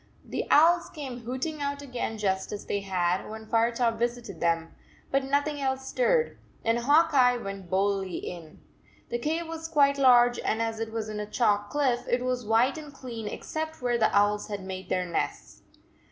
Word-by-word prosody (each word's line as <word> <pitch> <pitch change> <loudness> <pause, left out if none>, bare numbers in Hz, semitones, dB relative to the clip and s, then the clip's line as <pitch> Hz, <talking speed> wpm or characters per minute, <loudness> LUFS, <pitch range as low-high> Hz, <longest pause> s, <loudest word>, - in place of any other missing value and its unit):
The - - -3
owls 340 +3 +5
came 270 -6 -7
hooting 275 +5 -3
out 285 0 -3
again 245 -4 -4
just 190 -2 -1
as 210 - -6
they 200 - -1
had 185 -2 -1
when 220 0 -8
Firetop 230 +1 +1
visited 240 0 -3
them, 165 -1 0 0.4
but 275 0 +2
nothing 285 +2 0
else 265 0 -1
stirred, - - +1 0.3
and 230 +1 +2
Hawk 295 +6 +4
Eye 250 -2 +5
went 195 -5 -7
boldly 195 -1 0
in. 165 -3 -8 0.5
The 240 - -2
cave 320 +6 -1
was 325 0 -5
quite 280 -3 +3
large, 245 -2 +6
and 220 - -1
as 225 -1 -1
it 225 0 -3
was 225 -1 -3
in 215 -1 -5
a 210 0 -5
chalk 205 -4 +1
cliff, 265 -3 0
it 245 +1 +1
was 250 -1 -1
white 240 +7 +3
and 300 -2 -10
clean 240 -6 -7
except 315 +7 -5
where 245 -1 0
the 220 - +4
owls 205 +1 +2
had 205 -2 -5
made 190 0 -7
their 180 0 0
nests. 170 - -4
240 Hz, 185 wpm, -27 LUFS, 205-280 Hz, 0.5 s, large